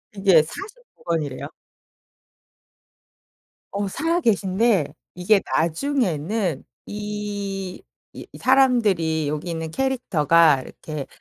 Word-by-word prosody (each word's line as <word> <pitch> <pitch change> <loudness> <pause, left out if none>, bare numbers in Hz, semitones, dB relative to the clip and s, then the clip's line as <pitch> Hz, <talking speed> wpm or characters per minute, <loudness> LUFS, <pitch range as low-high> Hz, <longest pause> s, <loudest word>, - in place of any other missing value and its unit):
이게 190 -6 +5
49 460 - -11
권이래요. 155 -6 -2 2.3
어 200 0 -2
살아 330 - 0
계신데 200 - +2 0.3
이게 190 +3 +3
나중에는 175 - 0 0.2
이 205 -2 -5 0.3
이 - - -9
사람들이 210 - +3
여기 155 +4 -3
있는 160 -1 -4
캐릭터가 165 - +3
이렇게 150 0 -7
190 Hz, 185 characters per minute, -23 LUFS, 160-225 Hz, 2.3 s, 이게